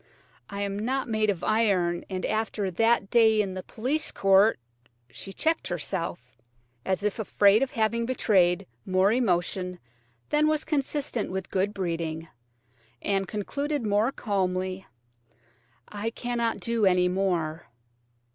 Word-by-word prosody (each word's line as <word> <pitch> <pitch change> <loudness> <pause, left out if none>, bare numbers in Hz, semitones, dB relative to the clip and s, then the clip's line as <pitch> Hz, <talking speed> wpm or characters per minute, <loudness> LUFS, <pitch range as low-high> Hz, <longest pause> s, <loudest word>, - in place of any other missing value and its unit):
I 200 0 -5
am 200 0 -3
not 260 +5 -1
made 215 -2 +1
of 185 -4 -1
iron, 195 -6 +1
and 185 -1 -3
after 215 -3 -1
that 225 +2 +2
day 220 -2 +5
in 195 -3 0
the 185 - -5
police 260 +11 -2
court–" 195 +3 +4 0.5
She 195 - -8
checked 320 +10 0
herself, 125 -8 -4 0.4
as 190 +1 -1
if 210 +1 -1
afraid 205 0 +4
of 270 - +1
having 230 -2 0
betrayed 185 -8 +2 0.2
more 185 +2 +2
emotion 180 -5 0 0.5
than 300 +1 +3
was 310 0 +1
consistent 285 -5 -1
with 190 0 -5
good 195 +2 +1
breeding, 165 -4 -3 0.7
and 195 +3 -1
concluded 280 +8 -3
more 210 +4 +2
calmly: 185 -4 -2 1.0
"I 210 +2 -3
cannot 235 -1 -2
do 230 -3 +2
any 180 -1 +4
more." 175 -4 -1
200 Hz, 130 wpm, -27 LUFS, 185-230 Hz, 1.0 s, day